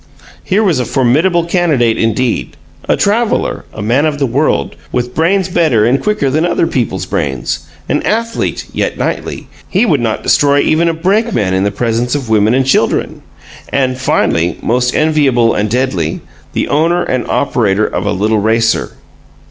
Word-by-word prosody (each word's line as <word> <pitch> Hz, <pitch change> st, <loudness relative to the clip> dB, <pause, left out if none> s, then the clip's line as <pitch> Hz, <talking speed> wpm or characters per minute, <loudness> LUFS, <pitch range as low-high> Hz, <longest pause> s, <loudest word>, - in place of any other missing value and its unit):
Here 200 Hz, +3 st, +1 dB
was 175 Hz, -10 st, +2 dB
a 125 Hz, -, -1 dB
formidable 150 Hz, -, +2 dB
candidate, 155 Hz, -10 st, +1 dB
indeed 115 Hz, +2 st, -1 dB, 0.3 s
a -, -, +3 dB
traveler, 220 Hz, +3 st, 0 dB
a 105 Hz, -, -7 dB
man 130 Hz, +8 st, +2 dB
of 150 Hz, -2 st, -2 dB
the 140 Hz, -, 0 dB
world, 125 Hz, -, 0 dB, 0.2 s
with 125 Hz, 0 st, -2 dB
brains 185 Hz, +3 st, +1 dB
better 155 Hz, -12 st, +2 dB
and 125 Hz, +4 st, +2 dB
quicker 210 Hz, -11 st, 0 dB
than 155 Hz, +4 st, +1 dB
other 175 Hz, -, +1 dB
people's 105 Hz, -, -2 dB
brains; 75 Hz, -3 st, -3 dB, 0.2 s
an 145 Hz, -, 0 dB
athlete, 230 Hz, +2 st, -2 dB
yet -, -, -2 dB
knightly -, -, -3 dB, 0.2 s
he 200 Hz, +6 st, +2 dB
would 155 Hz, -, +2 dB
not 110 Hz, -2 st, -2 dB
destroy 145 Hz, 0 st, +3 dB
even 170 Hz, +2 st, +2 dB
a 165 Hz, -, -2 dB
brakeman 185 Hz, -, 0 dB
in 95 Hz, +1 st, +1 dB
the -, -, +2 dB
presence 115 Hz, +4 st, -1 dB
of 135 Hz, -5 st, -4 dB
women 110 Hz, +1 st, +3 dB
and 135 Hz, 0 st, +2 dB
children 135 Hz, -, 0 dB, 0.5 s
and, 130 Hz, -2 st, 0 dB
finally, 85 Hz, -9 st, 0 dB
most 125 Hz, +2 st, 0 dB
enviable 140 Hz, -7 st, +2 dB
and 105 Hz, +1 st, -1 dB
deadly, 100 Hz, -10 st, -1 dB, 0.3 s
the -, -, -1 dB
owner 170 Hz, +4 st, +1 dB
and 130 Hz, -2 st, -2 dB
operator 110 Hz, -7 st, +1 dB
of 95 Hz, -, -3 dB
a -, -, +1 dB
"little 105 Hz, +2 st, +1 dB
racer"! 115 Hz, +2 st, +1 dB
130 Hz, 165 wpm, -13 LUFS, 110-165 Hz, 0.5 s, a